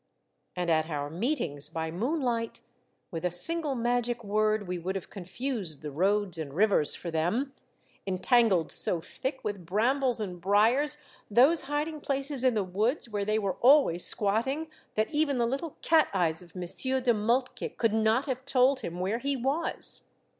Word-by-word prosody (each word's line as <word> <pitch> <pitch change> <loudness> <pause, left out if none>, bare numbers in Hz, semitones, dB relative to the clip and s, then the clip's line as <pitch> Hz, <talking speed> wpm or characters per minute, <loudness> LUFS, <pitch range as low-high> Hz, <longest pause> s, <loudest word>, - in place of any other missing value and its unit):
And 175 -2 -1
at 160 0 +1
our 145 -2 -4
meet 245 - -1
ings 145 -3 -4
by 160 0 -4
moonlight, 235 - -2 0.5
with 165 -2 -5
a 180 - +1
single 295 - +6
magic 240 0 -1
word 215 0 0
we 180 0 -3
would 185 +3 -4
have 190 - -6
confused 190 - -5
the 150 - -5
roads 190 +3 0
and 145 -3 -6
rivers 195 -6 +2
for 170 - -6
them, 215 - -1 0.5
entangled 190 - +2
so 175 - 0
thick 265 - -5
with 205 -4 -4
brambles 245 +7 +1
and 180 -5 -5
briars 230 - +2 0.3
those 265 +10 +4
hiding 300 +1 -2
places 275 -1 -1
in 255 -3 +3
the 210 - +1
woods 215 +8 -1
where 205 -1 -2
they 215 +1 +1
were 200 -4 -2
always 250 - +5
squatting 250 +10 +1 0.3
that 215 +5 0
even 295 -3 +1
the 240 - +2
little 275 +6 -4
cat 320 -1 +4
eyes 165 -3 +1
of 175 +1 -17
Monsieur 225 +9 -1
de 250 -2 +2
Moltke 235 +4 -1
could 230 -2 +1
not 220 +4 +2
have 260 -2 -4
told 265 0 +3
him 175 -7 -6
where 195 +6 -1
he 280 +2 -1
was. 270 +6 -2
220 Hz, 170 wpm, -28 LUFS, 180-265 Hz, 0.5 s, single